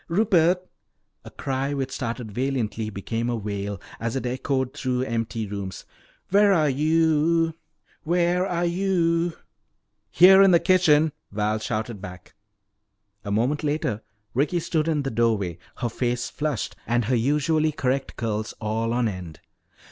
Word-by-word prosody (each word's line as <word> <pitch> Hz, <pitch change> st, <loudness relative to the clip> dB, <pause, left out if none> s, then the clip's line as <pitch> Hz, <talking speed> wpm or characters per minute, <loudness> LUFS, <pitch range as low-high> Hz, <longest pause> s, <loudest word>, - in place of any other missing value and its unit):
Rupert!" 180 Hz, -1 st, +2 dB, 0.6 s
A -, -, -10 dB
cry 135 Hz, +1 st, -2 dB
which 135 Hz, -1 st, -3 dB
started 115 Hz, -3 st, -4 dB
valiantly 115 Hz, -3 st, -2 dB
became 115 Hz, +3 st, -3 dB
a 120 Hz, -, 0 dB
wail 100 Hz, -2 st, -4 dB, 0.2 s
as 115 Hz, +1 st, -3 dB
it 130 Hz, -, -2 dB
echoed 130 Hz, +1 st, -1 dB
through 125 Hz, -1 st, -1 dB
empty 115 Hz, -2 st, -2 dB
rooms. 100 Hz, -2 st, -6 dB, 0.5 s
"Where 205 Hz, +1 st, +5 dB
are 155 Hz, -4 st, +3 dB
yo 160 Hz, +3 st, +2 dB, 0.5 s
o 170 Hz, -, +2 dB
ou!" 175 Hz, -1 st, +1 dB, 0.8 s
"Here, 190 Hz, -, +7 dB
in 195 Hz, -, +7 dB
the 170 Hz, -2 st, +6 dB
kitchen," 160 Hz, -5 st, +4 dB, 0.2 s
Val 105 Hz, +1 st, 0 dB
shouted 110 Hz, -1 st, -3 dB
back. 90 Hz, -2 st, -10 dB, 0.9 s
A 100 Hz, -, -6 dB
moment 125 Hz, +9 st, 0 dB
later 145 Hz, -8 st, -1 dB, 0.3 s
Ricky 145 Hz, +7 st, +1 dB
stood 160 Hz, -1 st, -1 dB
in 155 Hz, -3 st, +1 dB
the 135 Hz, -, -3 dB
doorway, 105 Hz, -7 st, 0 dB, 0.2 s
her 120 Hz, -, -2 dB
face 120 Hz, +1 st, -2 dB
flushed 150 Hz, -5 st, -3 dB
and 120 Hz, 0 st, +1 dB
her 125 Hz, +3 st, +1 dB
usually 150 Hz, +5 st, +2 dB
correct 135 Hz, -2 st, -2 dB
curls 110 Hz, -2 st, -3 dB
all 115 Hz, +2 st, -1 dB
on 120 Hz, -1 st, +1 dB
end. 90 Hz, -6 st, -6 dB
130 Hz, 140 wpm, -24 LUFS, 110-165 Hz, 0.9 s, Here